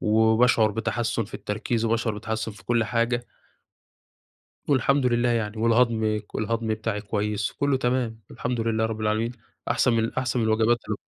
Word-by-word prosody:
وباشعُر 110 +1 +4
بتحسُّن 115 +1 -1
في 110 - -13
التركيز 110 +2 -2
وباشعُر 115 -1 0
بتحسُّن 110 0 -3
في 105 - -16
كل 120 -2 +2
حاجة. 120 +1 0 1.4
والحمد 140 -1 +3
لله 120 0 +2
يعني، 110 -2 -1
والهضم 115 -2 +2
ك 105 - -14
والهضم 115 +1 -1
بتاعي 110 -1 -3
كويس 105 0 -2
وكُلّه 140 -1 +1
تمام 120 -3 -1
الحمد 125 -2 -3
لله 110 0 +1
رب 110 -1 -5
العالمين، 110 +2 0 0.4
أحسن 120 +1 +3
من 115 0 +1
أحسن 130 -2 -1
من - - +1
الوجبات 110 +2 +3
ال - - 0
115 Hz, 155 wpm, -25 LUFS, 110-120 Hz, 1.4 s, وباشعُر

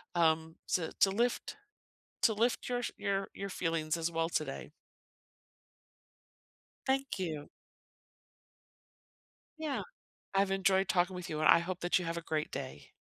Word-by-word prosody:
um, 160 -1 +3
to 165 -3 +1
to 195 - +6
lift 240 - 0 0.7
to 225 - +6
lift 230 +3 +1
your 245 0 0
your 195 -1 -1
your 200 0 -5
feelings 165 -3 0
as 165 0 -1
well 165 0 0
today. 150 -4 -3 2.2
Thank 270 -3 +1
you. 155 -5 -3 2.1
Yeah. 305 -4 -2 0.5
I've 195 0 +3
enjoyed 195 0 +3
talking 180 +1 +2
with 180 -1 -6
you, 155 - -2
and 155 - +4
I 170 - +8
hope 180 +1 -3
that 175 +1 +3
you 180 - -4
have 165 0 -2
a - - -2
great 155 -2 -2
day. 130 - -6
175 Hz, 140 wpm, -33 LUFS, 160-195 Hz, 2.2 s, I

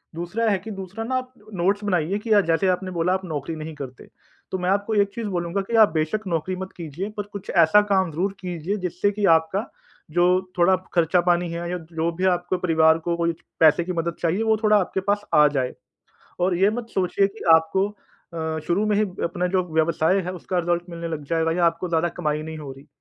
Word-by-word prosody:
दूसरा 205 +7 -1
है 200 - +2
कि 220 +3 -8
दूसरा 195 +2 -6
ना 260 +3 -2
आप 255 0 -6 0.2
नोट्स 195 +3 0
बनाइए 185 -1 0
की 220 - -1 0.2
जैसे 165 +4 +2
आपने 185 +1 -1
बोला 175 +1 +1
आप 190 0 -2
नौकरी 160 -1 -4
नहीं 155 0 -7
करते। 130 -3 -9 0.4
तो 190 - -1
मैं 180 +1 -1
आपको 205 +2 0
एक 200 -1 +3
चीज़ 230 -2 -3
बोलूँगा 175 +1 -2
कि 235 - 0
आप - - +3
बेशक 165 +7 -1
नौकरी 175 +2 -1
मत 190 0 -6
कीजिए 170 +4 -5
पर 205 - -1
कुछ 200 -1 -8 0.2
ऐसा 210 +6 +5
काम 190 -3 +2
ज़रूर 190 +6 -1
कीजिए 180 +2 -3
जिससे 180 +4 0
की 205 0 -1
आपका 190 +7 -4 0.4
जो 175 +2 +3 0.3
थोड़ा 175 +2 +5 0.2
खर्चा 175 +1 +3
पानी 175 -1 +1
है 170 +1 -4
या 180 - -1
जो 165 0 -3
भी 185 - -4
है 190 - +5
आपके 175 +1 -1
परिवार 160 -2 +4
को 170 0 0
कोई 170 0 +1 0.3
पैसे 160 +2 +6
की 180 +1 -4
मदद 170 0 -2
चाहिए 180 +6 +1
वो 220 -1 +2
थोड़ा 215 -1 +5
आपके 190 -1 -1
पास 205 0 -1
आ 150 0 +7
जाए। 130 -3 -1 0.7
और 180 0 +2
ये 195 +3 +4
मत 235 +1 -4
सोचिए 190 +1 +2
कि 205 +3 -11
आपको 160 +5 +2 0.5
अ, 160 -1 -2
शुरू 185 +5 +1
में 210 - +2
ही 215 - +3 0.2
अपना 175 +1 -1
जो 185 0 +1
व्यवसाय 160 +3 +2
है 180 - -3
उसका 180 +1 -3
रिजल्ट 175 0 0
मिलने 170 0 -5
लग 155 -3 -5
जाएगा 165 0 +1
या 175 +1 +1
आपको 170 +2 -1
ज़्यादा 170 0 +1
कमाई 155 -2 -1
नहीं 160 0 -7
हो 145 -3 -7
रही। 135 +3 -15
175 Hz, 225 wpm, -23 LUFS, 165-195 Hz, 0.7 s, आ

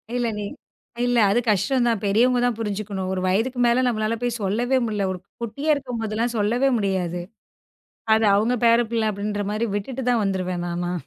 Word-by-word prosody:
இல்ல 245 -1 0
நீ - - -3 0.6
இல்ல 245 0 +1
அது 230 - +3
கஷ்டம்தான். 235 +1 +1
பெரியவங்க 240 +5 +3
தான் 245 -3 0
புரிஞ்சுக்கணும். 200 -3 -3
ஒரு 185 - -2
வயதுக்கு 225 +7 0
மேல 240 +2 +3
நம்மளால 220 -1 0
போய் 240 -1 -1
சொல்லவே 235 +7 +1
முடியல. 210 -3 -1
ஒரு 180 - -7 0.2
குட்டியா 280 +7 -3
இருக்கும்போதெல்லாம் 235 -3 -3
சொல்லவே 240 +6 +2
முடியாது. 185 -4 -1 0.9
அது 220 0 +2
அவுங்க 220 +5 +2
பேரப்பிள்ள 230 -1 +3
அப்பிடின்றமாரி 205 +2 -2
விட்டுட்டு 255 +6 -4
தான் 235 -3 +2
வந்துருவேன் 185 -2 -2
நானா. 175 +1 -2
220 Hz, 150 wpm, -23 LUFS, 200-240 Hz, 0.9 s, அது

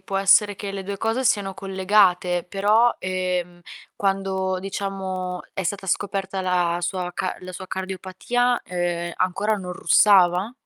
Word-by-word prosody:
può 195 -3 -4
essere 195 +1 +4
che 200 -1 -5
le 195 -1 -5
2 200 +1 -5
cose 225 +3 0
siano 200 -4 +1
collegate. 190 -2 +2
Però, 210 +6 +3
ehm, 180 -1 -2 0.3
quando, 195 -1 -1
diciamo, 190 -1 -4
è 190 - -3
stata 195 +2 -3
scoperta 195 0 -2
la 175 -2 +1
sua 180 0 -3
ca 185 -1 -2
la 185 0 -9
sua 185 +1 -8
cardiopatia, 190 +6 -1
ehm, 175 -1 -2
ancora 195 +4 0
non 180 -3 -5
russava? 185 +3 +4
190 Hz, 140 wpm, -23 LUFS, 180-200 Hz, 0.3 s, essere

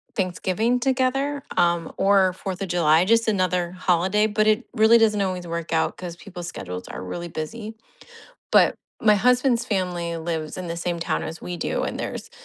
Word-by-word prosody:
Thanksgiving 190 +5 0
together, 270 +2 0 0.2
um, 170 -1 +2
or 195 -2 +4
Fourth 190 0 -6
of 195 - -2
July, 165 -1 +3
just 230 +3 +3
another 185 -4 +1
holiday, 185 +3 +1
but 215 0 +1
it 215 +3 +2
really 225 0 +6
doesn't 215 -2 +3
always 185 -2 -2
work 170 -1 -4
out 160 - +1
'cause 175 -2 -7
people's 175 -2 -8
schedules 90 - -7
are - - -6
really 170 - -5
busy, 215 +8 -6 0.8
but - - +5 0.3
my 215 -1 +5
husband's 245 +2 +3
family 180 -6 -2
lives 160 -2 -4
in 185 -2 -5
the 170 - -4
same 170 0 -3
town - - -1
as 165 - -6
we 180 - -5
do, 165 - -2
and - - -3
there's - - -5
185 Hz, 180 wpm, -23 LUFS, 170-220 Hz, 0.8 s, really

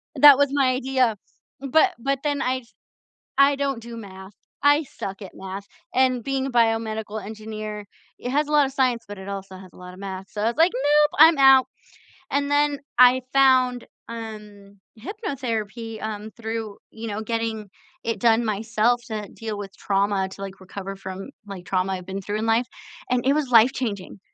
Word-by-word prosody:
That 290 -2 +9
was 285 -1 +3
my 270 -3 +3
idea, 255 -4 +1 0.4
but 315 +8 +3
but 275 +2 -1
then 290 -1 0
I 255 0 -1 0.7
I 275 0 +5
don't 275 -4 -2
do 235 0 -9
math, 190 -2 -10 0.3
I 290 +2 +5
suck 195 -6 -7
at 190 - -8
math, 195 +1 -7 0.3
and 255 -2 +2
being 270 -1 -1
a 270 - -3
biomedical 220 -2 0
engineer, 215 -1 -7 0.3
it 245 - -5
has 295 +1 +1
a - - -6
lotta 290 -3 +4
science, 255 -3 0
but 205 -1 -8
it 190 +1 -9
also 195 -1 -6
has 185 -1 -13
a - - -17
lotta 180 0 -11
math, 190 0 -7
so 210 - -4
I - - +1
was 235 - -1
like, 335 +3 +5
"Nope, 295 +3 +3
I'm 320 -1 +8
out." 270 -1 +7 0.7
And 280 0 0
then 290 -1 +2 0.2
I 250 +1 +7
found, 255 -2 +4 0.2
um, 210 -3 -9 0.2
hypnotherapy, 230 - -4
um, 215 0 -5
through, 225 -2 -5
you 225 0 -7
know, 210 +1 -3
getting 225 -2 -3 0.3
it 230 -3 -2
done 230 0 +4
myself 220 +3 +1
to 215 -2 -5
deal 220 -2 -6
with 200 -1 -8
trauma 195 -1 0
to, 195 - -11
like, 195 0 -7
recover 195 +1 -7
from, 190 +4 -8 0.2
like, 190 -3 -9
trauma 190 +1 0
I've 180 -1 -6
been 195 +1 -5
through 205 +2 -3
in 225 - -2
life, 225 +2 +2 0.4
and 250 0 0
it 275 - +4
was 295 -4 -1
life-changing. 225 -5 +2
225 Hz, 180 wpm, -24 LUFS, 200-265 Hz, 0.7 s, That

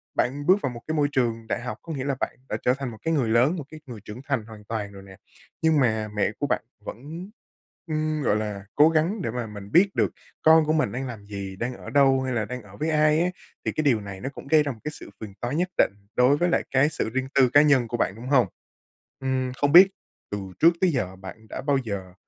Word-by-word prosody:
bạn 140 +4 0
bước 190 +3 +5
vào 135 - -1
một 120 -1 -9
cái 160 - -1
môi 145 -1 +3
trường 115 -4 0
đại - - -1
học, 125 - -5
có 165 - -6
nghĩa 130 -2 -3
là 140 -2 0
bạn - - -2
đã - - -1
trở 125 - +4
thành 135 -2 -4
một 110 - -10
cái 165 0 0
người 130 -7 +1
lớn, 125 +9 +3
một 150 - -4
cái 155 - -10
người 120 -5 -9
trưởng 110 +5 -8
thành 130 -6 -1
hoàn 110 -2 -12
toàn 105 -2 -4
rồi 100 -1 -11
nè. 95 -1 -14 0.4
Nhưng 160 -2 +3
mà 110 -4 +1
mẹ 105 0 +1
của 145 - 0
bạn - - 0 0.2
vẫn, 160 - -8 0.6
ưm, 155 -1 -1
gọi 105 - +2
là 105 -2 -3
cố 150 +2 +7
gắng 165 +6 +1
để 115 - -2
mà 120 -2 -4
mình 100 0 -10
biết 190 +4 +5
được - - +2 0.3
con 160 0 +6
của 155 - +1
mình 155 - +1
đang 130 +2 -4
làm 110 -4 -8
gì? 100 -2 -6
Đang 120 +5 -3
ở - - -10
đâu, 135 -2 +4
hay 130 -1 -2
là 110 -3 0
đang 125 +3 -6
ở 100 -1 -15
với 155 +2 -1
ai 155 0 +3
á? 175 - +2 0.4
Thì - - +1
cái 155 - -2
điều 125 -7 +3
này 100 -1 -8
nó 135 - -3
cũng 140 - -11
gây 155 0 +5
ra 145 - -2
một 110 - -11
cái 150 - -3
sự - - -11
phiền 105 -3 -8
toái 120 +4 -2
nhất 180 +2 0
định - - +3 0.2
đối 130 +4 +4
với 175 +2 +1
lại - - +1
cái 135 +3 +4
sự 110 - -2
riêng 130 +2 -2
tư 130 -3 +5
cá 145 +3 +6
nhân 135 -6 +4
của 120 - -3
bạn, 100 - 0
đúng 120 +3 -9
hông? 125 -7 +4 0.7
Ừm, 130 -1 -1
không 145 +2 0
biết 185 +3 +10 0.4
từ 105 - -2 0.2
trước 170 +1 +6
tới 185 -2 +4
giờ 95 -9 -2
bạn 95 +4 -11
đã - - -5
bao 140 0 +2
giờ, 95 -4 -5
130 Hz, 270 wpm, -25 LUFS, 110-150 Hz, 0.7 s, biết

